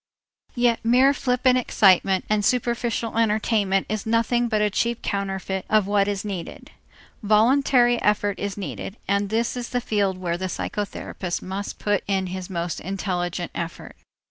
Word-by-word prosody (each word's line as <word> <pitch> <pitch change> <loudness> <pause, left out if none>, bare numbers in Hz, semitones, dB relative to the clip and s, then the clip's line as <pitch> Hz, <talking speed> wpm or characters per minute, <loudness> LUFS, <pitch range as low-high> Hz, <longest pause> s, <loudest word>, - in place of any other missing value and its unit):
Yet 240 -2 +2
mere 255 +4 +5
flippant 255 -1 +2
excitement 190 -4 +3
and 210 -1 +1
superficial 235 -1 0
entertainment 210 -3 +1
is 215 -1 -3
nothing 230 +1 +2
but 215 -2 0
a 210 0 +1
cheap 235 +3 -1
counterfeit 190 -1 -2
of 215 -2 +3
what 200 0 +2
is 205 0 -2
needed. 190 -5 -6 0.5
Voluntary 240 +3 +3
effort 205 -1 +1
is 200 0 -3
needed, 185 - -6
and 200 0 +1
this 225 +3 0
is 245 -1 -5
the 250 - 0
field 205 -5 0
where 175 -2 -2
the 185 - -2
psychotherapist 185 -1 -4
must 195 +2 -5
put 205 -2 0
in 195 -1 0
his 185 0 -6
most 170 -2 -3
intelligent 180 -2 -3
effort. 170 -1 -6
205 Hz, 150 wpm, -23 LUFS, 190-235 Hz, 0.5 s, mere